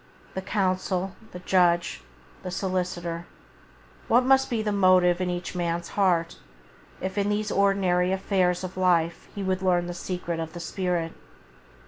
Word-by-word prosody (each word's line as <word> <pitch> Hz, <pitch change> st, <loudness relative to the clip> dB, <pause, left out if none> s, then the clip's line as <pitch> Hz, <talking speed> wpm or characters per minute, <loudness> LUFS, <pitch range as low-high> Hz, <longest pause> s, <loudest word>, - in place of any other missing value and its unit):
The 190 Hz, -, -3 dB
counsel, 185 Hz, -1 st, -1 dB, 0.2 s
the -, -, -7 dB
judge, 175 Hz, -, +2 dB, 0.4 s
the 185 Hz, -, -5 dB
solicitor, 180 Hz, -2 st, -3 dB, 0.8 s
what 245 Hz, +2 st, +4 dB
must 265 Hz, 0 st, +4 dB
be 230 Hz, -3 st, -1 dB
the 210 Hz, -, 0 dB
motive 185 Hz, -2 st, +4 dB
in 180 Hz, -, 0 dB
each 175 Hz, 0 st, -4 dB
man's 170 Hz, -1 st, -2 dB
heart 175 Hz, -4 st, +1 dB, 0.6 s
if 190 Hz, +2 st, -3 dB
in 200 Hz, 0 st, +1 dB
these 210 Hz, 0 st, -1 dB
ordinary 190 Hz, -2 st, +2 dB
affairs 190 Hz, -2 st, +1 dB
of 185 Hz, 0 st, -6 dB
life 170 Hz, -3 st, +1 dB
he 200 Hz, -, -3 dB
would 190 Hz, 0 st, -1 dB
learn 180 Hz, -2 st, +2 dB
the 175 Hz, -, -4 dB
secret 175 Hz, -1 st, -4 dB
of 160 Hz, -1 st, -5 dB
the 175 Hz, -, -7 dB
spirit 175 Hz, -2 st, -2 dB
185 Hz, 150 wpm, -26 LUFS, 175-195 Hz, 0.8 s, what